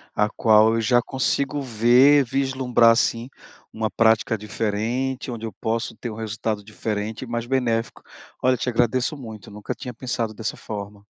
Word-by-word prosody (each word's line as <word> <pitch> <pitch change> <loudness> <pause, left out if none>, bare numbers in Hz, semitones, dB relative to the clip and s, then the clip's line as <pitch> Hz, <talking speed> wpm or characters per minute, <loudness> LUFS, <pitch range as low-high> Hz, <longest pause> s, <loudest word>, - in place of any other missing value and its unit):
a 105 - +2
qual 110 0 +4
eu 115 - +1
já 120 +2 +3
consigo 135 +3 -1
ver, 130 +4 +5
vislumbrar 130 -2 +2
assim, 115 +1 +1 0.4
uma 110 0 -2
prática 115 0 +3
diferente, 115 +5 -2
onde 115 -2 -5
eu 110 - -6
posso 115 +2 -3
ter 120 - -6
um 110 - -7
resultado 110 -1 -3
diferente 110 0 -4
e - - -8
mais 120 0 -3
benéfico. 120 -3 -1 0.4
Olha 130 0 +3
te 125 - -4
agradeço 125 +5 +1
muito, 110 -7 -10
nunca 105 0 -6
tinha 125 -3 -7
pensado 120 -2 -3
dessa 110 0 -4
forma. 100 -1 -8
115 Hz, 160 wpm, -23 LUFS, 110-125 Hz, 0.4 s, ver